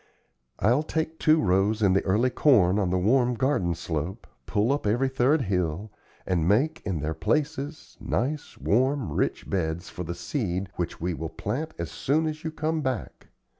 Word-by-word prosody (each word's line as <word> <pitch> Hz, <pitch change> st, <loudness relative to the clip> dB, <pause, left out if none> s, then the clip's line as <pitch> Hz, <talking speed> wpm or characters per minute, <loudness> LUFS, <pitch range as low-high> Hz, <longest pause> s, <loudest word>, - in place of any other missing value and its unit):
I'll 120 Hz, +8 st, +3 dB
take 160 Hz, +1 st, -3 dB
two 155 Hz, +1 st, +4 dB
rows 100 Hz, +2 st, +2 dB
in 95 Hz, -2 st, +5 dB
the 95 Hz, -, +3 dB
early 110 Hz, +7 st, +2 dB
corn 105 Hz, -11 st, +4 dB
on 95 Hz, -3 st, +1 dB
the 90 Hz, -, +1 dB
warm 120 Hz, +6 st, +3 dB
garden 115 Hz, -10 st, +1 dB
slope, 85 Hz, +8 st, -4 dB, 0.2 s
pull 105 Hz, +4 st, +1 dB
up 140 Hz, -6 st, 0 dB
every 120 Hz, +6 st, +2 dB
third 130 Hz, +3 st, +2 dB
hill, 95 Hz, 0 st, -1 dB, 0.3 s
and 85 Hz, -3 st, +1 dB
make, 150 Hz, -, +2 dB
in 90 Hz, -7 st, -2 dB
their 75 Hz, +2 st, -1 dB
places, 145 Hz, -, -2 dB
nice, 145 Hz, +5 st, -2 dB
warm, 130 Hz, -, +1 dB
rich -, -, -1 dB
beds 85 Hz, -2 st, -2 dB
for 90 Hz, -, -6 dB
the 85 Hz, +1 st, -5 dB
seed 95 Hz, -, -2 dB
which 85 Hz, -, -3 dB
we 90 Hz, +2 st, -1 dB
will 80 Hz, 0 st, -4 dB
plant 150 Hz, -, -4 dB
as -, -, -4 dB
soon 155 Hz, +4 st, +1 dB
as 155 Hz, 0 st, -4 dB
you 160 Hz, -, -2 dB
come 160 Hz, 0 st, -1 dB
back. 130 Hz, -4 st, -4 dB
110 Hz, 175 wpm, -26 LUFS, 90-145 Hz, 0.3 s, in